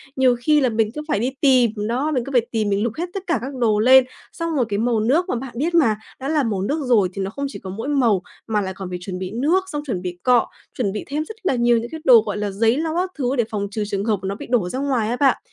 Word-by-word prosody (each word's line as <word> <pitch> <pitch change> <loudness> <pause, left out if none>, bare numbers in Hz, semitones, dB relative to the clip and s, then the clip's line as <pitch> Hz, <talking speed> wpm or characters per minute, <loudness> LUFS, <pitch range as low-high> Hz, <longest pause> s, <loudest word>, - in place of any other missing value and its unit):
Nhiều 255 -2 +4
khi 300 +4 +3
là 255 - +3
mình 220 -1 +1
cứ 300 - -3
phải 205 - 0
đi 250 +4 0
tìm 255 -5 +4
nó, 235 +8 -1
mình 250 -5 0
cứ 275 - -6
phải 245 -3 +4
tìm, 215 -3 0
mình 200 +1 +1
lục 235 -2 -1
hết 345 - -1
tất 390 -1 -4
cả 340 - +2
các 270 +2 -5
đồ 215 -3 +2
lên. 260 +3 +7 0.3
Xong 335 -2 -3
rồi 250 -4 +2
cái 205 0 -1
màu 230 -1 +1
nước 305 - +1
mà - - 0
bạn 250 +1 -6
biết 335 +5 0
mà, 245 -11 +4 0.2
đã 270 - -5
là 305 -3 +2
màu 205 -5 -1
nước 290 +10 -1
rồi 210 -7 +3
thì 195 - -4
nó 190 - -2
không 280 +6 -4
chỉ 275 - -8
có 190 - -8
mỗi 220 +8 -5
màu, 240 -10 +2 0.3
mà 215 -2 +1
lại 190 -1 -4
còn 190 -1 -7
phải 180 - -4
chuẩn 180 -1 -6
bị 185 +1 -5
nước 310 - +1
xong 295 -1 -3
chuẩn 185 -7 -2
bị 180 -1 -5
cọ, 250 -2 +4 0.3
chuẩn 210 -6 0
bị 210 - -4
thêm 295 +3 -2
rất 440 - -9
là 275 - +1
nhiều 240 0 +3
những 235 +1 -3
cái 320 -1 -7
đồ 235 -4 +8
gọi 210 -1 -3
là 205 -1 -2
giấy 225 +5 +2
lau 320 +1 -2
các 365 +1 -1
thứ 260 0 0
để 240 - +2
phòng 200 -2 -2
trừ 215 0 -2
trường 200 0 -2
hợp 215 -4 +1
nó 195 +1 -2
bị - - -9
đổ 220 -8 +1
ra 255 - -3
ngoài 255 -6 0
á 240 - 0
bạn. 280 -2 +4
240 Hz, 310 wpm, -21 LUFS, 210-280 Hz, 0.3 s, đồ